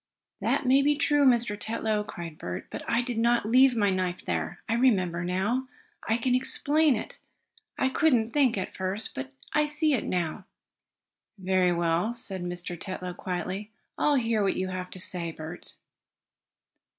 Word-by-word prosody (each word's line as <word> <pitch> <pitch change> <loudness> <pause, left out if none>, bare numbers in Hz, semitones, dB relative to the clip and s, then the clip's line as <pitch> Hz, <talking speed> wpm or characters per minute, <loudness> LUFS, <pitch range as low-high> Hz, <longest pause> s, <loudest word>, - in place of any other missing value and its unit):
"That - - 0
may 265 +2 +5
be 295 +1 +3
true, 290 0 +3
Mr. 235 -4 +3
Tetlow!" 215 0 0
cried 170 -5 -8
Bert, 90 0 -5
"but - - -5
I 235 - +2
did 240 -2 -3
not 235 -1 +3
leave 255 +3 +5
my 205 -3 +2
knife 185 -1 -2
there. 80 -2 -2
I 225 - 0
remember 185 -8 +2
now 200 +9 -1 0.4
I 225 - +3
can 245 +1 +1
explain 285 +3 +2
it! 215 - -6 0.6
I 265 - +2
couldn't 255 -6 +2
think, 260 -5 +3
at 190 - -4
first, 190 +3 -2
but 130 0 -6 0.2
I 300 0 +3
see 300 0 +1
it 245 - +1
now." 180 +2 -2 0.9
"Very 185 -1 +2
well," 170 +6 0
said 195 -6 -3
Mr. 175 0 -4
Tetlow 185 -1 -4
quietly, 185 +3 -4 0.3
"I'll 295 - +2
hear 230 -4 +1
what 195 - +1
you 185 0 -1
have 185 0 -5
to 185 - -9
say, 175 -2 0
Bert." 160 +2 -9
210 Hz, 165 wpm, -27 LUFS, 180-250 Hz, 0.9 s, may